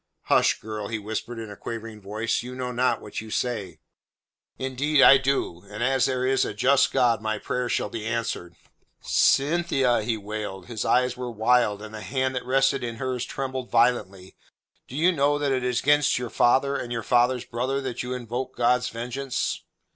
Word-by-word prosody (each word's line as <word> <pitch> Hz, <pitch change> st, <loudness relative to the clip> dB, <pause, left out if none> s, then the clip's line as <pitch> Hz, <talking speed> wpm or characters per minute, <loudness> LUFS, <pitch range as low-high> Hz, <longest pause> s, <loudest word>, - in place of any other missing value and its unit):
"Hush, -, -, +3 dB
girl," 110 Hz, -1 st, -5 dB
he 110 Hz, -, -3 dB
whispered 110 Hz, +3 st, -5 dB
in 110 Hz, -2 st, -7 dB
a -, -, -8 dB
quavering 115 Hz, 0 st, -7 dB
voice. 105 Hz, +3 st, -2 dB
"You 125 Hz, +1 st, -8 dB
know 125 Hz, -1 st, -3 dB
not 125 Hz, -1 st, +1 dB
what 105 Hz, -, -6 dB
you 110 Hz, -, -10 dB
say." 105 Hz, -8 st, -2 dB, 0.8 s
"Indeed 135 Hz, +3 st, 0 dB
I 135 Hz, -, +9 dB
do; 130 Hz, -10 st, -1 dB
and 110 Hz, +3 st, -4 dB
as 135 Hz, 0 st, +2 dB
there 130 Hz, -1 st, -1 dB
is 130 Hz, 0 st, +2 dB
a 105 Hz, -, -4 dB
just 130 Hz, +5 st, +3 dB
God 120 Hz, -4 st, +2 dB
my 110 Hz, 0 st, -1 dB
prayer 125 Hz, +3 st, -3 dB
shall -, -, 0 dB
be 110 Hz, -1 st, -6 dB
answered." 110 Hz, -7 st, -3 dB, 0.5 s
"Cynthia," 135 Hz, -5 st, +2 dB
he 110 Hz, +1 st, -1 dB
wailed. 105 Hz, -3 st, -6 dB
His 110 Hz, +1 st, -4 dB
eyes 125 Hz, 0 st, +2 dB
were 125 Hz, -1 st, -5 dB
wild, 110 Hz, -2 st, +2 dB
and 110 Hz, 0 st, -9 dB
the 110 Hz, -, -7 dB
hand 130 Hz, +1 st, -1 dB
that 125 Hz, -, -4 dB
rested 135 Hz, 0 st, +2 dB
in 115 Hz, -1 st, -4 dB
hers 125 Hz, 0 st, -3 dB
trembled 130 Hz, -2 st, -4 dB
violently. 115 Hz, -6 st, +1 dB, 0.5 s
"Do 130 Hz, -, -10 dB
you 170 Hz, +5 st, +4 dB
know 145 Hz, -3 st, +2 dB
that 145 Hz, -1 st, 0 dB
it 130 Hz, -1 st, 0 dB
is 125 Hz, -1 st, 0 dB
against 145 Hz, 0 st, +3 dB
your 125 Hz, -2 st, -4 dB
father 135 Hz, +3 st, +3 dB
and 120 Hz, -, -4 dB
your 115 Hz, -2 st, -2 dB
father's 125 Hz, +1 st, +2 dB
brother 130 Hz, +3 st, -2 dB
that 130 Hz, -3 st, -4 dB
you 125 Hz, +1 st, -4 dB
invoke 125 Hz, +2 st, -5 dB
God's 125 Hz, +1 st, +2 dB
vengeance?" 125 Hz, +3 st, -3 dB
125 Hz, 190 wpm, -25 LUFS, 110-130 Hz, 0.8 s, I